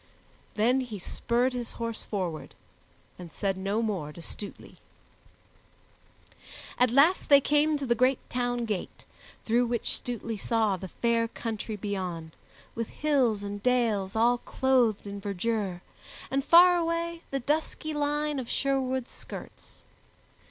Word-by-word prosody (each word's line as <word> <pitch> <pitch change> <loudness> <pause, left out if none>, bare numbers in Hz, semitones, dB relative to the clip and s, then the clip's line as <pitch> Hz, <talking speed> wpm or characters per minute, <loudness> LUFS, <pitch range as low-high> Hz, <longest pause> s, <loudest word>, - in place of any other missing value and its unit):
Then 240 +5 +3
he 245 -5 -4
spurred 240 +6 0
his 245 -2 -4
horse 230 -1 -3
forward 180 -6 -4 0.6
and 175 -2 -9
said 195 +5 -1
no 200 +4 -1
more 185 -9 -2
to 160 - -12
Stutely. 200 +4 -8 2.0
At 250 0 +5
last 280 +9 +4
they 280 -1 +9
came 295 +2 +2
to 285 - -4
the 240 - +3
great 255 +2 +3
town 245 -1 -1
gate, 210 -5 -5 0.4
through 240 +2 +2
which 235 -1 0
Stutely 230 -2 -4
saw 220 -1 +1
the 190 +1 -7
fair 230 +5 +1
country 225 -1 -4
beyond, 185 -5 -4 0.4
with 230 -1 -3
hills 260 -9 +1
and 205 0 -5
dales 225 -6 +1
all 240 +2 +3
clothed 250 -7 +1
in 200 0 -6
verdure, 200 -2 -2 0.5
and 270 +1 +1
far 350 +3 +7
away 335 0 -1
the 275 - -1
dusky 310 +3 -1
line 295 0 0
of 245 - -6
Sherwood's 260 -2 0
skirts. - - -10
235 Hz, 135 wpm, -28 LUFS, 205-265 Hz, 2.0 s, they